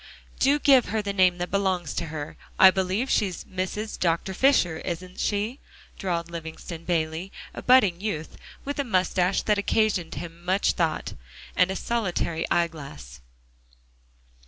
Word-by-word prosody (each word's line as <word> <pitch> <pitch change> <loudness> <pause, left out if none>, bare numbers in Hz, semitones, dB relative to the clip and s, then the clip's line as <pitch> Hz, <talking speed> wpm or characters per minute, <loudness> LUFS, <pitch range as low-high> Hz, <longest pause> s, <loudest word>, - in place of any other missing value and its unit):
"Do 280 +2 +4
give 270 -4 +5
her 220 -1 -2
the 200 -1 -2
name 185 -2 +4
that 175 0 -4
belongs 190 -4 0
to 170 - -3
her. 150 -1 -6 0.2
I 190 - +9
believe 190 +6 -1
she's 195 -8 0
Mrs. 190 +4 -4
Dr. 170 +2 0
Fisher, 185 - +3
isn't 180 +1 -6
she?" 215 +6 -1 0.4
drawled 170 -3 -2
Livingston 165 0 -7
Bayley, 165 +2 -1 0.2
a - - -7
budding 205 -9 +4
youth, 160 -7 -4 0.3
with 285 +1 -4
a - - +2
moustache 185 -4 +1
that 210 -1 +2
occasioned 200 -5 +1
him 170 +2 -8
much 190 +3 +2
thought, 165 -3 -1 0.4
and 180 0 +4
a 190 - -2
solitary 190 -8 -1
eyeglass. 140 - -3
185 Hz, 145 wpm, -26 LUFS, 170-205 Hz, 0.4 s, I